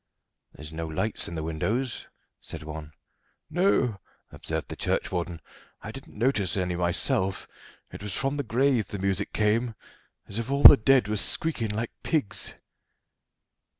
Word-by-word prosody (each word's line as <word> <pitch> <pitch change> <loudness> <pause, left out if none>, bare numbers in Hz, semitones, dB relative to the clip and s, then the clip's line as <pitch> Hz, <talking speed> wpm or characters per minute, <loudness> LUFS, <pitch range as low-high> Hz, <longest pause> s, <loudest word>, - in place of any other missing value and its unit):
"There's 75 +1 -9
no 80 0 -4
lights 90 +8 0
in 85 - -6
the 80 - -3
windows," 110 +11 -2 0.3
said - - -8
one. 75 -1 -8 0.6
"No," 155 - +2 0.3
observed - - -4
the - - -5
churchwarden, 85 -2 -2 0.4
"I - - -6
didn't - - -12
notice 105 -7 +1
any 90 -1 -1
myself; 90 +2 0 0.4
it - - -9
was 100 -2 -4
from 135 +1 -1
the 140 - -1
graves 125 0 +1
the 100 - -5
music 95 +1 -1
came, 110 +2 +1 0.5
as 100 - -4
if 115 +2 -4
all 140 +1 0
the - - +13
dead 130 -2 +3
was 105 -1 +1
squeakin' 140 -9 +1
like 110 +3 -3
pigs." 150 -11 -2
105 Hz, 150 wpm, -27 LUFS, 90-125 Hz, 0.6 s, the